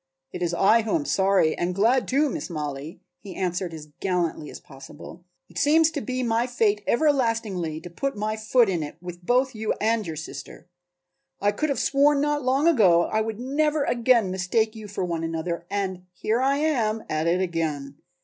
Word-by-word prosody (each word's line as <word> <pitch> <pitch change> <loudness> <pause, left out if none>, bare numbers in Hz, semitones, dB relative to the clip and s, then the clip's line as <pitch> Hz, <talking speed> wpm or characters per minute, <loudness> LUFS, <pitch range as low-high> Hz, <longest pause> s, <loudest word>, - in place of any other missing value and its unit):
"It - - -6
is 175 -1 0
I 200 +6 +4
who 220 +8 -1
am 305 -3 -1
sorry 190 - +2
and 175 +1 -2
glad 235 +6 +2
too, 285 +4 +2
Miss 300 - -4
Mollie," 150 -1 -5 0.2
he 195 -4 -10
answered 180 -1 -2
as 155 -2 -9
gallantly 175 -5 -1
as - - -9
possible. 145 +5 -12 0.2
"It - - -7
seems 320 +2 +4
to 295 -3 -4
be 255 0 -3
my 230 +1 +1
fate 215 -4 +1
everlastingly 230 - +1
to 175 - -9
put 275 +8 -3
my 215 +1 -1
foot 220 +2 +3
in 180 -4 -1
it 145 -1 -6
with 175 0 -9
both 255 +6 +2
you 220 -1 -2
and 220 -2 0
your 160 - -4
sister. 145 +2 -9 0.7
I 205 +1 +2
could 305 +8 -2
have 280 - 0
sworn 285 +1 +3
not 295 0 0
long 270 +4 +2
ago 190 - +5
that - - -5
I 220 - +2
would 220 0 -4
never 295 +3 0
again 235 -6 +2
mistake 215 +4 0
you 215 -1 -8
for 195 -2 -3
one 170 -2 -3
another 165 +1 -3
and 190 -2 -3
here 220 +6 -1
I 275 +1 +2
am 235 -8 0
at 155 +1 -1
it 175 +2 +2
again. 155 -6 -3
210 Hz, 195 wpm, -25 LUFS, 175-255 Hz, 0.7 s, ago